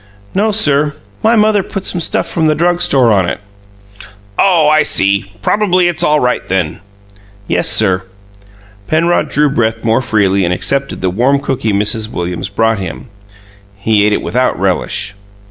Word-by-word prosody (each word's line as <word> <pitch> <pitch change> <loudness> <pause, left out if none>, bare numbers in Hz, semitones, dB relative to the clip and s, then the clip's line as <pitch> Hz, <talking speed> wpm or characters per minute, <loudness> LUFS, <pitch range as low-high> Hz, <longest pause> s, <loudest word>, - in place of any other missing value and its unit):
"No, 210 +3 +1
sir. 150 -8 +2 0.3
My 225 +1 +3
mother 215 -2 +3
put 195 +1 -6
some 175 - -1
stuff - - -1
from 160 -2 0
the 155 - +2
drug 175 +2 +1
store 130 -4 +3
on 95 -4 +2
it." - - -4 1.0
"Oh, 170 -6 +4
I 155 +1 +4
see. 100 -3 0
Probably 185 -4 +2
it's 175 0 -1
all 150 -2 +3
right, 125 -2 0
then." 90 -5 -1 0.7
"Yes, 90 +1 +1
sir." 95 -4 +2 0.9
Penrod 165 -1 +1
drew 150 +1 +2
breath 115 -3 -1
more 115 +2 +2
freely, 100 -5 +1
and 85 - 0
accepted 135 +7 -1
the 90 -1 0
warm 130 +8 +1
cookie 130 -5 -2
Mrs. 105 +2 0
Williams 90 -1 -4
brought 115 +1 0
him. 95 +6 -7 0.7
He 100 +1 +1
ate 105 - +2
it - - -1
without 125 -5 0
relish. 95 +2 -1
125 Hz, 160 wpm, -13 LUFS, 100-160 Hz, 1.0 s, Oh